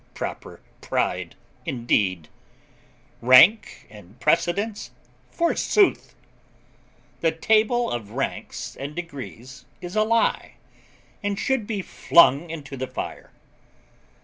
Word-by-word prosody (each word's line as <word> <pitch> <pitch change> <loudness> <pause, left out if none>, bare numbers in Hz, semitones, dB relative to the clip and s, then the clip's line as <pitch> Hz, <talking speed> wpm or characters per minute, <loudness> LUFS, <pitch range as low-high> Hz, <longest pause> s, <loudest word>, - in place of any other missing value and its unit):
Proper - - -7 0.2
pride, - - -2 0.3
indeed! 100 - -1 0.9
Rank 130 - +5
and 105 +2 -16
precedence, 175 - 0 0.4
forsooth! 360 +3 +1 1.0
The 165 - +2
table 220 +7 +2
of 110 -4 -4
ranks 135 +5 -5
and 145 +2 -7
degrees 140 -5 -9
is 175 +2 -8
a 215 - +3
lie, 225 +1 +1 0.7
and 205 -1 -2
should 245 -1 -1
be 205 -4 -3
flung 170 -2 +4
into 145 -4 -7
the 130 0 -4
fire. - - -7
165 Hz, 95 wpm, -24 LUFS, 125-215 Hz, 1.0 s, Rank